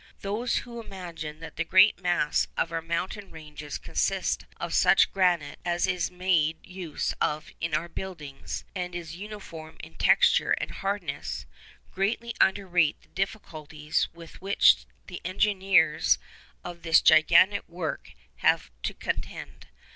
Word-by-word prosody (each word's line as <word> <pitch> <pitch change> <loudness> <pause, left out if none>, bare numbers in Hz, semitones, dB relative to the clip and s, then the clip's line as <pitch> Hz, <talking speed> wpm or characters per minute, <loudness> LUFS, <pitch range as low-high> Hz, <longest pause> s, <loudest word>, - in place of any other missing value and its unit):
Those 215 +5 -1
who 235 -1 -8
imagine 165 -7 -8
that 160 - -10
the 170 - +1
great 185 +5 +5
mass 175 -4 +1
of 165 - 0
our 165 0 -2
mountain 180 +5 -3
ranges 150 -2 -8
consists - - -1 0.2
of - - -4
such - - +5
granite 175 -6 +1
as 175 0 +1
is 180 -2 -1
made 180 -4 +1
use 180 -4 -4
of 150 +1 -1
in 165 -2 0
our 170 - -1
buildings, 160 -7 -7
and 180 -2 -4
is 170 -2 -6
uniform 180 -5 -9
in - - -10
texture 485 - +4
and - - -2
hardness, 200 +1 -4 0.5
greatly 230 +5 -1
underrate 180 -5 +2
the - - -26
difficulties 155 -6 -3
with 170 0 -13
which 190 - +4 0.2
the - - -8
engineers 185 -3 +3 0.5
of 175 -1 -8
this 165 0 +5
gigantic 175 +6 +5
work 170 -2 -5 0.2
have - - +3
had - - -20
to - - -2
contend. - - -5
175 Hz, 140 wpm, -27 LUFS, 160-195 Hz, 0.5 s, great